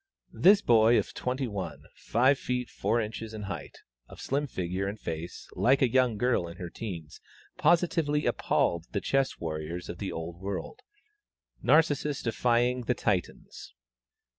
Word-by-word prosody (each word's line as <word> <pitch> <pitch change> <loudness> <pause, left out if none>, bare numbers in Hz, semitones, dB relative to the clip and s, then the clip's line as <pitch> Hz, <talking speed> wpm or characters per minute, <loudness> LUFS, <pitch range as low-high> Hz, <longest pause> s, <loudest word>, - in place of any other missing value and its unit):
This 200 +2 +5
boy 115 0 +5
of - - -1
twenty 130 +1 -2
one, 95 -8 -5
five 130 +4 +2
feet 125 -1 -3
four 120 - 0
inches 110 0 -5
in 105 - -6
height, 90 -7 -6 0.3
of - - -13
slim 145 +2 -1
figure, 95 -3 -3
and 105 +2 -5
face 80 -1 -6
like 135 +2 +3
a 125 - +3
young 125 -3 +3
girl 120 -6 +1
in 85 +1 -10
her 90 -2 -6
teens, 85 -9 -7 0.4
positively 165 -4 +2
appalled 85 -1 +1
the 100 - +1
chess 135 -1 0
warriors 80 +2 -5
of 85 - -6
the 100 - -3
old 85 +1 -6
world 100 0 -5 0.8
Narcissus 150 -2 +2
defying 120 +1 +1
the 125 - +1
Titans. 100 -7 -3
115 Hz, 150 wpm, -29 LUFS, 90-130 Hz, 0.8 s, This